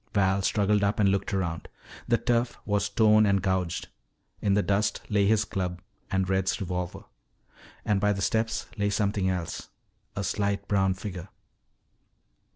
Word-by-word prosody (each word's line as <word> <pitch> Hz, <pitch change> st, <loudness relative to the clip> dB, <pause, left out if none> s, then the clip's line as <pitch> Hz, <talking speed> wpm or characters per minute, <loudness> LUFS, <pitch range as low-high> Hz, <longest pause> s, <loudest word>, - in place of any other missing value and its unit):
Val 95 Hz, -1 st, +3 dB
struggled 105 Hz, +1 st, +2 dB
up 100 Hz, +1 st, +1 dB
and 100 Hz, -2 st, +4 dB
looked 100 Hz, 0 st, 0 dB
around. 85 Hz, -4 st, -2 dB, 0.4 s
The 120 Hz, -, +3 dB
turf 120 Hz, 0 st, 0 dB
was 105 Hz, -1 st, 0 dB
torn 110 Hz, -1 st, +5 dB
and 100 Hz, -1 st, +3 dB
gouged. 95 Hz, -3 st, -1 dB, 0.5 s
In 100 Hz, -1 st, +2 dB
the 105 Hz, -, +2 dB
dust 100 Hz, +1 st, +1 dB
lay 100 Hz, -2 st, +3 dB
his 105 Hz, 0 st, +3 dB
club 90 Hz, -2 st, -3 dB, 0.3 s
and 95 Hz, -1 st, 0 dB
Red's 95 Hz, 0 st, 0 dB
revolver. 90 Hz, -2 st, -4 dB, 0.8 s
And 100 Hz, -2 st, +1 dB
by 105 Hz, 0 st, +3 dB
the 100 Hz, -1 st, -2 dB
steps 110 Hz, +2 st, 0 dB
lay 100 Hz, 0 st, +2 dB
something 100 Hz, -2 st, 0 dB
else, 90 Hz, -3 st, -4 dB, 0.5 s
a -, -, -2 dB
slight 100 Hz, -1 st, -1 dB
brown 95 Hz, -2 st, +2 dB
figure. 95 Hz, -2 st, -7 dB
100 Hz, 155 wpm, -27 LUFS, 95-105 Hz, 0.8 s, torn